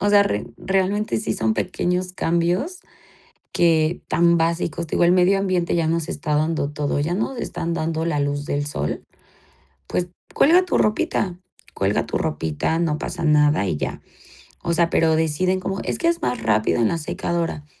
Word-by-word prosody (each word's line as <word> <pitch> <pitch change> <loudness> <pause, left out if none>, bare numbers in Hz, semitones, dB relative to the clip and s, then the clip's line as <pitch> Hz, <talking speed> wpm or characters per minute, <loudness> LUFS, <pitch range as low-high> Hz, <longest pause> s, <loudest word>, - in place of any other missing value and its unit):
O 205 - +1
sea, 205 0 +7
re 105 - -2
realmente 195 - 0
sí 110 - -2
son 110 -1 +1
pequeños 180 0 -1
cambios 180 - 0 0.7
que 165 0 +2
tan 170 +1 +3
básicos, 170 0 -1
digo, 175 - +1
el 170 - +5
medio 185 +2 +4
ambiente 185 -3 0
ya 165 -2 +1
nos 165 +1 -1
está 150 -4 -2
dando 155 -1 0
todo, 145 -1 -2
ya 165 +5 0
nos 240 +5 -2
están 170 -6 -3
dando 160 0 -2
la 155 -3 0
luz 145 0 -1
del 145 0 -1
sol. 75 - -3 0.8
Pues, 180 0 -1 0.3
cuelga 345 +5 +5
tu - - +1
ropita, 195 -4 0 0.3
cuelga 100 +1 0
tu - - -2
ropita, 80 - -1
no 155 -3 0
pasa 175 -1 -4
nada 150 -7 +4
y 75 - -1
ya. - - -4 0.6
O 170 - 0
sea, 170 0 +3
pero 160 -1 +3
deciden 160 +4 +1
como 195 +1 -3
es - - -2
que 335 - 0
es 340 0 +1
más 125 - -1
rápido 110 +1 +2
en 110 - +4
la 170 - -1
secadora. 165 -1 -3
170 Hz, 180 wpm, -22 LUFS, 150-185 Hz, 0.8 s, sea